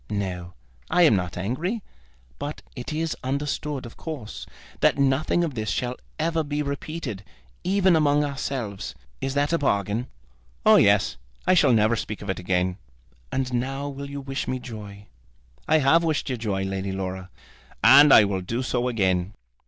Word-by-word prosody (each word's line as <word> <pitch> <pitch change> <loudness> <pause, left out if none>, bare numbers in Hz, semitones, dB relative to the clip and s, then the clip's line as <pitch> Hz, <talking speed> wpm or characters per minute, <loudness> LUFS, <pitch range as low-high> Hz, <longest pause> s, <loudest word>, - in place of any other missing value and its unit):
"No, 90 -4 -4 0.3
I 180 - +4
am 150 -10 +6
not 90 -2 -2
angry. 160 - -2 0.6
But 145 +1 -5
it 125 +2 -6
is 160 +1 -1
understood, 140 +1 -2
of 115 - -11
course, 145 -10 -7 0.3
that - - +3
nothing 140 +5 +2
of 160 -4 -2
this 110 -3 -3
shall 125 0 -1 0.2
ever 165 0 0
be 145 0 -2
repeated, 140 - -5 0.4
even 190 -1 +3
among 150 -1 +3
ourselves. 130 -8 -4 0.3
Is 135 +1 -2
that 145 +3 +1
a 165 - +2
bargain?" 105 -1 0 0.6
"Oh, - - +8
yes. - - +4 0.3
I - - +4
shall 170 - +5
never 110 0 +4
speak 110 -2 -5
of 100 - -2
it - - -5
again." 90 +1 0 0.5
"And 130 -1 -1
now 135 +3 -2
you 140 0 -5
will - - -13
wish 135 +1 -4
me 130 - -1
joy?" 105 -5 -9 0.6
"I 155 - +5
have 155 +4 +4
wished 155 -4 0
you - - 0
joy, 105 -5 -2
Lady 95 0 -3
Laura. 95 -1 -4 0.5
And 145 0 +9
I 110 - +9
will 100 -2 -1
do 115 +8 -3
so 125 -1 0
again. 95 -4 0
130 Hz, 170 wpm, -25 LUFS, 100-145 Hz, 0.6 s, And